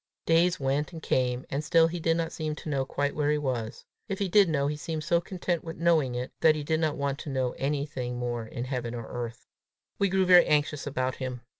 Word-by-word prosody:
Days 170 +2 +3
went 140 +4 -1
and 160 -2 -8
came, 125 -1 0
and 140 +3 -1
still 165 +1 +5
he 170 +1 -4
did 165 0 +1
not 165 -1 -2
seem 155 -1 -3
to 155 - -7
know 135 -2 0
quite 145 +1 -1
where 150 -1 +1
he 150 - +2
was; 125 -5 -3 0.2
if 195 - -2
he 200 - 0
did 195 0 +5
know, 140 -3 +1
he 150 +1 -1
seemed 155 +1 -4
so 170 +2 +2
content 175 -1 -3
with 165 -1 -7
knowing 160 -7 +2
it, 125 +1 -4
that 155 -1 +5
he 150 - -3
did 160 +1 0
not 155 -2 0
want 140 0 -2
to 155 - -6
know 130 -2 0
anything 140 -3 -2
more 120 -2 -3
in 120 +2 -5
heaven 125 -2 -3
or 115 -1 -5
earth. 120 0 -6 0.5
We 200 - +3
grew 190 0 +2
very 180 -1 +7
anxious 150 -1 +1
about 130 -2 -1
him. 130 -2 -5
145 Hz, 240 wpm, -28 LUFS, 130-165 Hz, 0.5 s, very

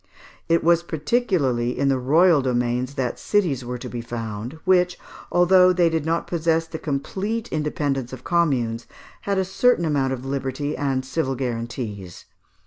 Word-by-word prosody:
It 165 0 +3
was 170 +1 +4
particularly 155 - 0
in 140 - +1
the 135 -1 +2
royal 155 +4 +4
domains 125 +1 -1
that 130 -3 -2
cities 170 -12 0
were 125 +1 -4
to - - -7
be 120 - -5
found, 115 +3 -6
which, 180 -1 +3 0.3
although 180 +1 +5
they 175 -2 +3
did 160 -1 -1
not 165 +1 0
possess 165 -1 0
the 160 0 -7
complete 195 - -3
independence 145 -4 -2
of 130 -1 -9
communes, 125 -10 0 0.4
had 200 - +1
a 190 - +1
certain 195 0 +2
amount 140 -4 +1
of 130 0 -6
liberty 135 +2 -3
and 135 -2 -1
civil 135 0 -1
guarantees. 115 -7 -5
145 Hz, 155 wpm, -23 LUFS, 125-170 Hz, 0.4 s, although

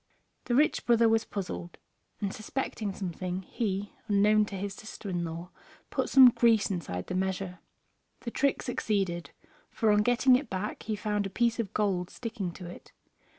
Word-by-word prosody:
The 240 - +1
rich 300 +4 +2
brother 235 -1 +5
was 225 0 +3
puzzled, 90 - -5 0.4
and 200 -1 -2
suspecting 215 -2 -3
something 185 -1 -4
he, 200 -1 -3
unknown 210 +1 +4
to 200 - -7
his 195 +1 -4
sister 220 0 -8
in 175 -2 -1
law, 170 +2 -6 0.4
put - - -1
some 260 -2 +9
grease 225 -4 +3
inside 120 - -3
the - - -5
measure. 185 -1 -2 0.6
The 235 - -5
trick 280 +2 +1
succeeded, 195 -8 -1 0.4
for 220 -2 +2
on 210 0 +4
getting 245 +3 +5
it 270 +3 -1
back 190 +3 -3
he 215 - -2
found 210 -1 -1
a - - -8
piece 235 +4 +1
of 210 -4 -2
gold 190 -4 0
sticking 220 -6 -4
to 180 - -9
it. 175 - -11
205 Hz, 170 wpm, -29 LUFS, 185-225 Hz, 0.6 s, some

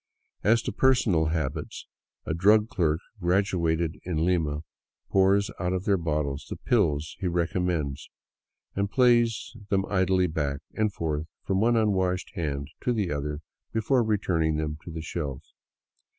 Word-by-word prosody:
As 115 +3 +4
to - - -2
personal 110 -11 +3
habits: 80 -4 -3 0.4
a - - -1
drug 105 +6 +4
clerk 80 -5 +1 0.2
graduated 85 -3 +1
in 80 -3 -1
Lima 80 -5 +1 0.5
pours 100 +3 +3
out 90 +1 0
of 95 0 -2
their 100 - +4
bottles 75 -4 -2
the - - -4
pills 80 -10 +1
he 95 - -1
recom 90 +1 0
mends, 75 -6 -2 0.7
and 100 0 0
plays 120 -2 +3
them 95 -1 +2
idly 95 -2 +2
back 75 -4 -2
and 110 -1 +1
forth 80 -3 -2 0.2
from 95 0 0
one 120 +1 +4
unwashed 95 -4 +1
hand 70 -4 -3
to 125 - +2
the 105 -7 -1
other 75 +1 -3 0.3
before 120 +4 +2
returning 90 -8 +1
them 75 0 -2
to - - -7
the 80 -1 -5
shelf. 70 -6 -4
90 Hz, 150 wpm, -27 LUFS, 80-100 Hz, 0.7 s, As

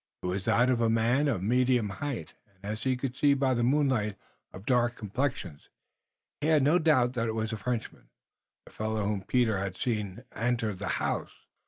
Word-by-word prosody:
It - - -4
was 90 +1 -2
that 125 +2 +3
of 120 -2 +1
a 115 - +3
man 115 +6 +2
of 115 -10 -1
medium 125 0 +2
height, 130 +6 -5 0.2
and 95 +1 -15
as 105 +3 -4
he 130 -1 +1
could 130 0 -4
see 140 +1 +4
by 135 -1 +2
the 120 - 0
moonlight, 125 -5 +2 0.4
of 95 +2 -11
dark 120 -1 +2
complexion. 105 - -3 0.8
He 150 - 0
had 155 -3 +4
no 155 +6 +4
doubt 130 -7 +3
that 115 -2 -1
it 110 - -2
was 110 0 -2
a - - -3
Frenchman, 115 +2 -4 0.6
the - - -15
fellow 110 0 -2
whom 100 -1 -1
Peter 110 0 +1
had 95 -1 -4
seen 105 -6 -2
enter 115 -2 0
the 90 - -6
house. - - -3
120 Hz, 195 wpm, -29 LUFS, 105-130 Hz, 0.8 s, see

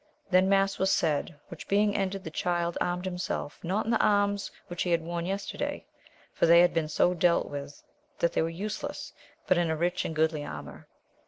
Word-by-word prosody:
Then 185 +1 +5
mass 195 0 +2
was 190 0 +2
said, 155 0 0
which - - -9
being 205 +1 +2
ended, 195 -1 -1
the 160 - -6
Child 175 +1 -1
armed 180 +1 -1
himself, 180 -5 -4
not 190 +5 -1
in 225 - -1
the 225 - +3
arms 205 -1 +2 0.2
which 175 0 -5
he 180 - 0
had 170 -1 +2
worn 170 +1 -3
yes 195 +1 -2
terday, - - -4 0.5
for - - +2
they 170 +1 +8
had 175 - +4
been 165 -2 0
so 165 +3 +2
dealt 175 0 +2
with 140 0 -7 0.3
that 170 - +1
they - - +2
were 165 - 0
useless, 200 +6 -5 0.3
but 185 - +3
in 170 -1 +1
a 160 - 0
rich 175 +2 0
and 160 - -4
goodly 155 -1 +1
armour. - - -8
175 Hz, 210 wpm, -28 LUFS, 165-195 Hz, 0.5 s, they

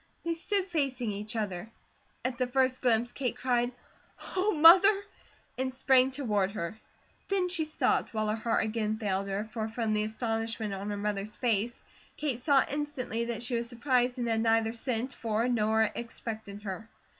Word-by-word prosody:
They 335 - +1
stood 380 +3 0
facing 270 - -1
each 210 +2 -6
other. 205 -2 -3 0.6
At 255 0 -2
the 255 - +1
first 260 0 +1
glimpse 240 -1 +2
Kate 260 -3 -2
cried, 245 -1 +1 0.6
"Oh, 380 +3 +2
Mother," 380 +5 +7 0.6
and 260 0 0
sprang 260 0 +4
toward 210 -8 0
her. 205 +2 -4 0.5
Then 380 -2 +1
she 345 -3 0
stopped, 310 - +1
while 215 -1 -1
her 215 - +1
heart 225 0 0
again 220 -1 -1
failed 200 -2 -1
her, 195 +1 -2
for 220 0 -4
from 220 -1 -1
the 210 0 +1
astonishment 225 -1 -2
on 195 +1 -4
her 205 - -2
mother's 205 0 -3
face, 235 -1 0 0.3
Kate 275 -6 -1
saw 275 +1 +4
instantly 275 -6 -2
that 235 -1 -4
she 245 +1 -4
was 235 0 -1
surprised, 250 0 +1
and 240 -1 -1
had 225 -1 +1
neither 225 0 +2
sent 245 +1 -2
for 225 0 -1
nor 220 -2 +2
expected 220 -3 -6
her. 210 +3 -6
235 Hz, 170 wpm, -30 LUFS, 215-260 Hz, 0.6 s, Mother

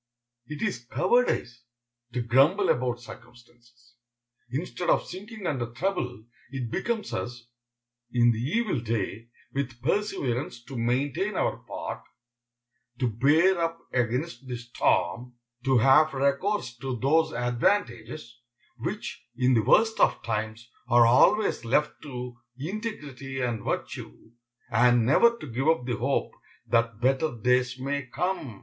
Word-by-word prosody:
It 150 -1 -5
is 180 - -2
cowardice 180 - +1 0.5
to 125 -1 -1
grumble 140 - +4
about 125 -1 +1
circumstances. 120 0 -16 0.5
Instead 170 +7 -3
of - - +3
sinking 205 +3 -9
under 130 -7 -1
trouble, 125 - -2 0.2
it 125 -3 -5
becomes 220 +1 -2
us, 120 -1 -4 0.7
in 120 -1 +4
the 110 - -2
evil 180 - 0
day, 115 -1 -3 0.3
with 130 -3 -3
perseverance 135 - -1
to 135 - -10
maintain 140 - 0
our - - 0
part, - - -5 1.0
to 125 -1 +1
bear 155 - +4
up 165 0 -1 0.2
against 130 +4 -1
the 125 -1 -4
storm, 120 0 0 0.3
to 135 -1 +4
have 135 +5 +5
recourse 140 - 0
to 130 -1 -3
those 155 +6 +2
advantages, 120 - -1 0.4
which, - - -5
in 130 0 +3
the 115 - +4
worst 220 - +3
of - - +3
times, 110 0 -3 0.2
are 120 -1 +7
always 130 - +4
left 145 +6 +2
to 125 -4 -7 0.2
integrity 145 - -5
and 120 -4 -2
virtue, 110 - -5 0.4
and 120 0 +4
never 235 - +5
to - - -9
give 130 +2 -2
up 160 -6 +3
the 120 -3 -2
hope 135 +5 0 0.3
that 115 -2 +1
better 135 +2 +1
days 125 +2 +2
may 140 +1 -3
come. 150 - -3
130 Hz, 130 wpm, -27 LUFS, 120-155 Hz, 1.0 s, are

